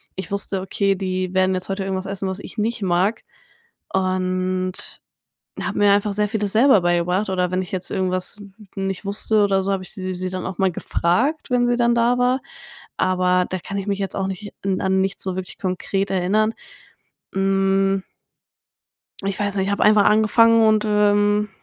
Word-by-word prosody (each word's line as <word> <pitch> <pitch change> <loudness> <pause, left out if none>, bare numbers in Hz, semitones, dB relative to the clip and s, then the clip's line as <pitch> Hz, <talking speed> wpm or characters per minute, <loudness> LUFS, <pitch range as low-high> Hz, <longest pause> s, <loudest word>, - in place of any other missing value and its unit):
ich 190 +2 -6
wusste, 200 -1 -1
okay, 195 +1 0
die 185 -1 -3
werden 185 0 +2
jetzt 185 - -2
heute 195 0 -2
irgendwas 190 0 -3
essen, 195 -1 -3
was 190 +2 -4
ich - - -11
nicht 225 +1 -1
mag 190 +4 +1 0.7
und 185 0 0 0.9
habe - - -3
mir 205 -1 +5
einfach 205 0 +1
sehr 210 0 0
vieles 210 -2 -2
selber 230 -3 +5
beigebracht 175 +3 +1
oder 180 -1 0
wenn 185 0 0
ich 180 - -11
jetzt 185 -1 -3
irgendwas 185 0 -1 0.4
nicht 195 0 -3
wusste 210 +1 +1
oder 195 -1 +2
so, 195 - -1
habe 190 -1 -1
ich - - -11
sie 185 -2 -4
sie 185 0 -3
dann 185 0 -5
auch 190 -2 -5
mal 190 -1 +2
gefragt, 250 - 0
wenn 245 -1 +3
sie 245 - +2
dann 235 0 +3
da 240 +1 +2
war, 250 +2 +2 0.6
aber 180 -1 +2
da 185 - -2
kann 200 +3 -6
ich 195 +1 -4
mich 200 0 -1
jetzt 195 - -3
auch 195 -1 -1
nicht 195 +2 -6
an 190 -1 0
an 190 0 +2
nichts 195 +1 -2
so 190 -1 -3
wirklich 185 0 -6
konkret 195 +1 -2
erinnern, 205 +4 +1 0.8
hm. 195 0 +1 1.2
Ich 195 -1 -2
weiß 205 -1 -1
nicht, 190 - 0
ich 200 - -1
habe 200 - +1
einfach 210 -1 +5
angefangen 225 +1 +5
und, 215 -1 +3
ähm, 210 0 +2
195 Hz, 190 wpm, -21 LUFS, 185-210 Hz, 1.2 s, mir